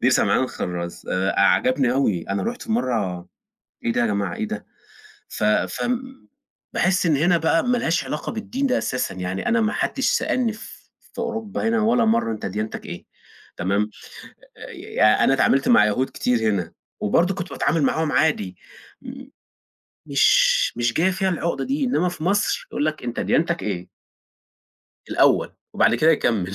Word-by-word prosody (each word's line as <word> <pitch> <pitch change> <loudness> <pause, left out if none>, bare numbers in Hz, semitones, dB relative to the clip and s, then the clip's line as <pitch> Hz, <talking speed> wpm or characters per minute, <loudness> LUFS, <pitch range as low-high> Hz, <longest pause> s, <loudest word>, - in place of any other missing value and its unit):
دير - - +3
سمعان - - +3
الخرَّاز، 85 -1 -5
آآ 95 +1 0
أ - - 0
عجبني 120 +7 +3
أوي 110 -10 +1
أنا 100 +1 -1
رُحت 245 +1 -4
في 225 - -4
مرة 100 - -1 0.6
إيه 115 - +1
ده - - 0
يا 120 - +2
جماعة، 100 -4 -1
إيه - - -4
ده، - - -6 0.6
ف - - -5
فم 250 - -1 0.5
باحس 185 0 +1
إن 155 -4 +3
هنا 170 +4 +3
بقى 165 +1 +2
ما 245 0 +1
لهاش 170 -10 0
علاقة 150 +3 -4
بالدين 245 +5 -2
ده 255 - +1
أساسًا، 125 -6 -2
يعني 90 +1 -4
أنا 235 -1 +2
ما 215 -1 +1
حدش 270 - -1
سألني 240 -4 0
ف 215 - -13 0.2
في 240 - -9
أوروبا 225 -2 -3
هنا 225 0 +1
ولا 230 +2 +3
مرة 220 - +1
أنت 110 - -5
ديانتَك 105 +3 -4
إيه 85 - -8 0.5
تمام؟ 100 +3 0 1.1
آآ 110 0 +5
أنا 135 - +4
إتعاملت 135 0 +2
مع 105 - +6
يهود 125 +6 0
كتير 125 -1 0
هنا، 90 -4 -3 0.3
وبرضه 175 - +2
كنت 180 -4 -6
باتعامل 145 +3 0
معاهم 155 +2 0
عادي، 105 - +1 0.5
م - - -10 0.8
مش - - +3
مش 120 0 0
جاية 185 +4 +2
فيها 190 +1 0
العقدة 170 -1 -2
دي، 275 +2 -1
إنما 180 -8 +1
في 175 -3 -8
مصر 205 +4 0
يقول 145 - -1
لَك 155 -2 -3
أنت 120 -1 -4
ديانتَك 170 +1 0
إيه. 90 -4 -4 1.2
الأول، - - +3 0.2
وبعد - - +3
كده 160 +1 +4
يكَمّل. 105 - 0
150 Hz, 170 wpm, -22 LUFS, -, 1.2 s, مع